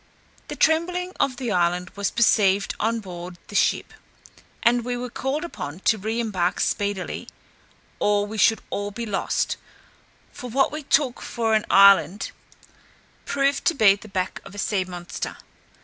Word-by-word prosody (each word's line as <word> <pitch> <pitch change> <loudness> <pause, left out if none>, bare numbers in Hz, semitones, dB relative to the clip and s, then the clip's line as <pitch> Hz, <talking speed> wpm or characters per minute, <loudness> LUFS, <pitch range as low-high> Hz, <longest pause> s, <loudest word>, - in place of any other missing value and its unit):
The - - -5
trembling 360 +3 +1
of 255 -2 +1
the 245 -3 -3
island 180 -1 +1
was 200 -1 -2
perceived 200 -4 +3
on 225 +1 0
board 175 -2 -8
the - - -10
ship, - - +1 0.7
and 240 0 +3
we 245 +1 -2
were 245 0 -5
called 270 +6 -2
upon 165 - -7
to 220 - +2
re 220 +4 -2
embark 185 -6 -1
speedily, 200 -3 -2 0.7
or 205 0 +2
we 215 +1 -6
should 225 +2 +4
all 205 0 -2
be 230 +3 -5
lost; 205 -3 -1 0.8
for 250 - -8
what 270 +4 +2
we 305 +1 -5
took 275 -3 +1
for 225 -2 -1
an 215 -1 +2
island 200 0 +5 0.9
proved 275 0 +1
to 340 - +3
be 215 -7 +6
the 205 +2 -10
back 190 -2 -3
of 195 - -12
a - - -9
sea 200 -2 0
monster. 175 -1 -6
215 Hz, 160 wpm, -24 LUFS, 195-245 Hz, 0.9 s, be